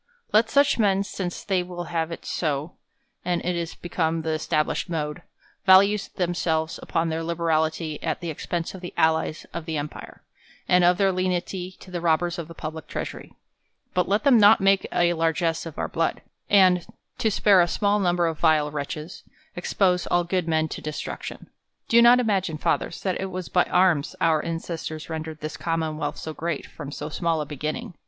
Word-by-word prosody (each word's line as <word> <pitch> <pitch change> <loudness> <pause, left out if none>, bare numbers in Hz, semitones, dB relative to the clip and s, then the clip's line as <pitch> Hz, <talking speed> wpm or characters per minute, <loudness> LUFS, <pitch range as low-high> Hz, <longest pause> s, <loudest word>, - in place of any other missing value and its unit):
Let 220 +1 +4
such 280 -2 +3
men, 200 -2 +3
since 185 -3 -5
they 190 -3 +1
will 175 -1 -6
have 165 -1 -2
it 165 - -7
so, 150 0 -2 0.5
and 175 -1 0
it 180 0 0
is 170 -1 -4
become 165 -2 -1
the 160 - -1
established 155 +2 -1
mode, 150 -3 -3 0.5
value 200 +2 +7 0.2
themselves 170 -3 -1
upon 165 0 -1
their 160 0 -2
liberality 160 -2 -1
at 160 - -2
the 170 -2 -4
expense 170 +2 -4
of 190 - -9
the 175 - -8
allies 160 0 +1
of 165 - -5
the 160 -1 -2
em 145 +1 -2
pire, - - -12 0.4
and 180 0 +4
of 175 0 +5
their 195 0 +3
lenity 185 0 -2
to 185 - -12
the 175 - -3
robbci 165 0 +2
s 175 - -6
of 165 - -5
the 165 - -11
public 155 0 -6
treasury: - - -6 0.6
but 180 - +1
let 205 +5 +2
them 270 -5 +6
not 210 +1 +7
make 195 0 +3
a 175 0 +3
largess 165 0 0
of 160 - -10
our - - -1
blood; 165 0 -1 0.3
and, 185 -3 +5 0.3
to 220 - +2
spare 200 -2 +5
a 175 - +3
small 205 +4 +1
number 175 -2 +2
of 160 -2 -2
vile 155 -2 +3
wrctclies, 150 +3 -5 0.3
expose 180 0 +1
all 175 0 +2
good 180 0 -1
men 160 -1 +1
to - - -7
destruction. 155 0 -6 0.4
Do 235 +1 +6
not 240 +1 +7
imagine, 195 -9 0
Fathers, 165 - -1
that 185 -1 -1
it 190 - -3
was 185 -1 -5
by 180 - +3
arms 170 -6 +2
our 160 -2 +2
ancestors 165 -1 -5
rendered 160 -1 -5
this 155 +1 -5
Commonwealth 160 -2 -2
so 160 - -6
great, 165 -1 -3
from 145 -2 -9
so 150 - -5
small 165 0 0
a 150 - -2
beginning. 150 +4 -4
170 Hz, 190 wpm, -25 LUFS, 160-185 Hz, 0.6 s, value